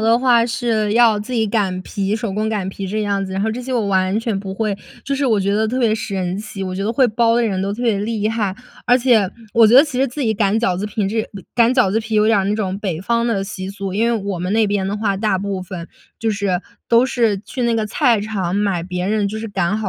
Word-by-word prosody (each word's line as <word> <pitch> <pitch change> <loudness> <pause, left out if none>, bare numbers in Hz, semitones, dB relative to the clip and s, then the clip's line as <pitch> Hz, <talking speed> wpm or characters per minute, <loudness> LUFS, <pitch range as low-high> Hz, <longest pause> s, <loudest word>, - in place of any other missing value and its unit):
的 225 +1 +4
话 240 -2 +3
是 225 -3 0
要 230 -2 +5
自 215 +5 -6
己 225 -2 +2
擀 190 -4 -1
皮 200 +2 -2
手 220 -3 -3
工 215 +2 -1
擀 200 -4 -2
皮 195 0 -5
这 215 +3 -2
样 200 -1 -1
子， 190 - -7
然 195 +1 -1
后 220 - 0
这 235 +3 -4
些 260 +1 -5
我 220 -5 0
完 190 +2 +1
全 225 -4 -2
不 195 -1 -6
会。 215 -1 -1 0.3
就 275 0 -1
是 275 -1 0
我 215 -4 +2
觉 200 +1 0
得 220 +1 +1
特 255 +4 -2
别 225 -3 +3
神 195 -4 -2
奇， 210 -2 -6
我 185 -1 -3
觉 195 +2 -3
得 225 - 0
会 255 0 +3
包 230 +1 +2
的 240 - +2
人 195 -4 -1
都 200 +1 -1
特 240 +4 -5
别 220 -4 +2
厉 215 0 -1
害。 210 -4 -1 0.3
而 245 +1 +5
且， 235 -6 +3 0.2
我 230 -1 +6
觉 230 - +4
得 270 - +10
其 260 -4 -4
实 270 - +3
自 270 +4 -6
己 220 -2 +2
擀 205 0 +1
饺 185 -6 +1
子 205 +3 -3
平 205 -2 -2
这 220 +1 0
呃， 200 -4 -10
擀 235 +1 +4
饺 245 -8 +3
子 220 - +1
皮 220 0 -4
有 210 0 +4
点 220 -2 +4
儿 195 - +1
那 205 +2 0
种 195 -3 -2
北 180 -6 -3
方 235 +4 0
的 200 -4 0
习 190 -1 -6
俗。 195 -1 -5
因 220 +4 +1
为 235 -1 +2
我 195 -3 -3
们 180 +3 -2
那 220 0 +3
边 200 -2 0
的 205 +2 -2
话 205 -2 0
大 210 -1 +1
部 195 0 -3
分， 180 -2 -7 0.3
就 225 -1 +1
是 200 -3 -1 0.3
都 235 +2 +5
是 230 -5 +1
去 245 +5 -6
那 235 -1 +2
个 220 -1 0
菜 230 0 +2
市 215 - -5
场 190 -4 -2
买 200 -4 0
别 180 0 -3
人 210 -1 +1
就 215 +2 -4
是 225 - -5
擀 195 0 0
好 215 -3 -2
210 Hz, 310 characters per minute, -19 LUFS, 195-230 Hz, 0.3 s, 得